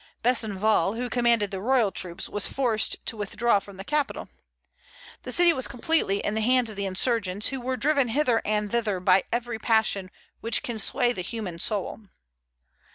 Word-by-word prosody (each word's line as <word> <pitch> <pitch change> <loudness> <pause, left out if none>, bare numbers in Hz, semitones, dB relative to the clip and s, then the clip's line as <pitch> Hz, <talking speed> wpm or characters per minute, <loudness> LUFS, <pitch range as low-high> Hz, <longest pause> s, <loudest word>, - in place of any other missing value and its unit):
Besenval, 220 -3 +1
who 245 +1 -4
commanded 235 -4 +2
the 190 -1 -5
royal 235 -2 +2
troops, 175 -2 -2
was 205 - 0
forced 235 -5 -1
to - - -2
withdraw 210 +1 +1
from 195 -1 -14
the 195 - -7
capital. 295 +5 -2 0.9
The - - -5
city 350 -1 +5
was 260 -4 +1
completely 245 -6 0
in 205 - -1
the 220 - -1
hands 245 0 +3
of - - -10
the 200 0 -3
insurgents, 200 0 0
who 270 -2 -5
were 255 +1 -2
driven 280 +1 +2
hither 245 -1 +1
and 210 -1 -1
thither 220 -5 0
by 185 +1 +3
every 235 -1 -3
passion 220 -5 +1 0.3
which 230 0 0
can 235 -3 -4
sway 240 +4 +1
the 185 - -4
human 185 -3 -6
soul. 205 +2 -3
225 Hz, 175 wpm, -25 LUFS, 200-245 Hz, 0.9 s, city